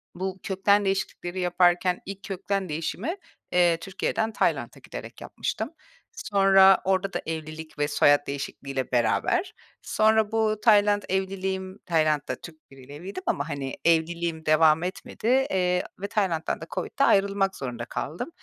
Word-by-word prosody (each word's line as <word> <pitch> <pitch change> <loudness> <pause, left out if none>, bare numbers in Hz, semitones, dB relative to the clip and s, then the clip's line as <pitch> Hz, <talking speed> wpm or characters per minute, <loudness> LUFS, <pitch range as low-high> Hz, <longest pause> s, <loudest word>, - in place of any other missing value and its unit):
bu 190 +1 -4
kökten 200 +1 +2
değişiklikleri 190 -1 -2
yaparken 180 0 +2
ilk 195 0 -8
kökten 195 -1 -3
değişimi, 180 - -3 0.4
eee, 175 -2 +4
Türkiye’den 195 +5 -2
Tayland’a - - -1
giderek - - -9
yapmıştım. 220 +3 -4 0.5
Sonra 195 - +5
orada 190 +1 0
da - - -2
evlilik 155 -1 -6
ve 145 - +2
soyad 145 -1 +3
değişikliğiyle 140 -1 -4
beraber, 360 - +1 0.3
sonra 220 0 +2
bu 215 -1 +1
Tayland 205 -2 +5
evliliğim, 190 0 -2
Tayland’da 155 -4 +1
Türk 155 -4 -14
biriyle 135 +1 -12
evliydim 185 +3 -7
ama, 145 +2 -1
hani, 140 -3 -4
evliliğim 165 0 +1
devam 155 +1 +4
etmedi, 185 +4 -5
eee, 190 -8 +2 0.2
ve 200 - -3
Tayland’dan 185 -6 -1
da - - -5
COVID'de 275 - -1
ayrılmak 195 -3 +3
zorunda 120 -3 -5
kaldım. 135 - -5
185 Hz, 135 wpm, -26 LUFS, 160-195 Hz, 0.5 s, Sonra